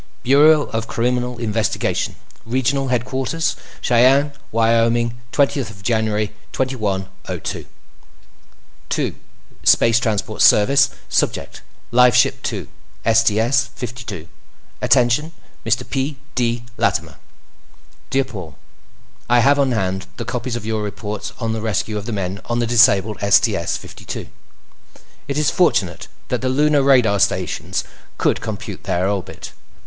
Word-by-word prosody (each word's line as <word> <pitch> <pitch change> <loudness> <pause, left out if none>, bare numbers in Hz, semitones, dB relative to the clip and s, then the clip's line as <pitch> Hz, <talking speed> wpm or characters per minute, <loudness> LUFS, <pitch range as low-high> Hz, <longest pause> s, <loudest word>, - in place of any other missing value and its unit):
Bureau 145 +3 +6
of 115 0 -2
Criminal 125 +1 -1
Investigation 110 -1 -1 0.3
Regional 130 +3 0
Headquarters 130 +5 -1 0.3
Cheyenne, 130 +4 +4 0.2
Wyoming 115 +1 +2 0.2
20 140 -1 +2 0.2
January 110 -1 0 0.2
2102 95 - -3 1.2
To: - - -1 0.5
Space 115 0 +5
Transport 110 -2 -2
Service 135 +7 +5 0.2
Subject: - - -1 0.3
Lifeship 125 -1 +4
2, - - -4 0.5
STS 115 +3 +3
52 110 -8 -7 0.5
Attention 135 +5 +2 0.3
Mr. 115 +1 0
P. 135 +1 -2 0.2
D. 120 -1 0
Latimer - - 0 0.9
Dear 135 0 +2
Paul, 95 -10 -9 0.7
I 120 0 +5
have 140 +3 +4
on 135 -2 +2
hand 95 -3 -2
the - - -5
copies 125 0 -3
of 120 - -5
your 110 -1 -1
reports 105 0 -5
on 115 -2 -1
the 110 - -3
rescue 110 0 -1
of 100 - -9
the - - -3
men 95 -2 -3
on 120 - -2
the 120 - +1
disabled 110 -3 +4
STS 100 -4 +2
52. - - -8 1.0
It 140 0 -3
is 150 -1 +2
fortunate 115 - +1 0.2
that - - -1
the 130 - 0
Lunar 145 +2 +3
radar 125 -7 +4
stations 95 -3 0 0.3
could - - +1
compute - - -6
their 90 +2 0
orbit. 100 -2 -4
115 Hz, 120 wpm, -20 LUFS, 105-130 Hz, 1.2 s, Bureau